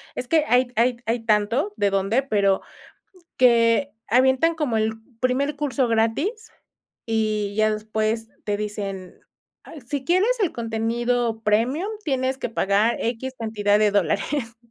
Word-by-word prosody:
Es 250 - -4
que 315 +1 +3
hay 250 0 +3
hay 240 +2 +2
hay 230 +2 0
tanto 225 - +1
de 200 -1 +1
dónde, 195 +7 +1
pero 200 -6 +1 0.8
que 235 +2 +4 0.2
avientan 260 +7 +3
como 275 -8 -1
el 220 0 0 0.3
primer 265 +3 0
curso 280 -3 0
gratis 235 - -1 0.6
y 215 -2 -1
ya 215 0 +3
después 220 +1 -2 0.2
te 205 -1 -1
dicen: 200 -3 -5 0.5
"Ah, - - -12
si 280 -1 -3
quieres 395 - +2
el 375 - +1
contenido 230 0 -1
premium, 240 - +1 0.2
tienes 265 -2 -1
que - - -3
pagar 210 +1 +1
equis 250 +3 -3
cantidad 210 -2 +1
de 210 -1 +4
dólares". 225 +4 -1
230 Hz, 140 wpm, -23 LUFS, 215-265 Hz, 0.8 s, que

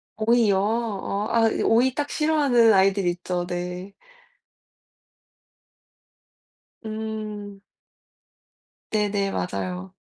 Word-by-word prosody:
오이요? 220 -2 +3
어 210 -1 -1
아 225 -1 +4 0.2
오이 240 +3 +3
딱 290 +1 -3
싫어하는 280 -8 +3
아이들 195 0 +3
있죠. 175 0 -2
네. 180 +2 -5 2.9
음. 215 -2 -6 1.3
네네. 205 -2 0
맞아요. 90 - -4
205 Hz, 145 characters per minute, -24 LUFS, 185-225 Hz, 2.9 s, 아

